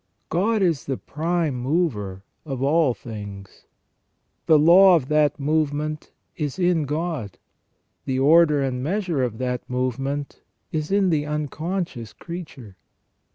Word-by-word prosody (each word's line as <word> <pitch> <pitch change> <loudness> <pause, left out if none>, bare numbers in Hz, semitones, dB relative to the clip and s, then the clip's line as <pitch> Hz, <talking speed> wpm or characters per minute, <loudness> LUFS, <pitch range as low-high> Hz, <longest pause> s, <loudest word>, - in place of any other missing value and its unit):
God 205 +4 +1
is 165 -6 +1
the 135 -2 -2
prime 165 0 -1
mover 120 - -1 0.2
of 135 -4 -4
all 145 -3 +3
things. 100 -4 -10 0.8
The 160 - +7
law 175 +5 +7
of 135 -6 -1
that 150 -1 +2
movement 150 +1 -1 0.2
is 150 -2 -3
in 175 -4 +2
God; 150 - -3 0.7
the 130 - -1
order 150 +1 +5
and 125 -2 -2
measure 175 -1 -1
of 120 -4 -2
that 125 0 -3
movement 135 +3 -3 0.3
is 155 +2 -3
in 195 -2 +3
the 150 -2 0
unconscious 150 - -4
creature. 155 - -9
150 Hz, 125 wpm, -23 LUFS, 130-170 Hz, 0.8 s, The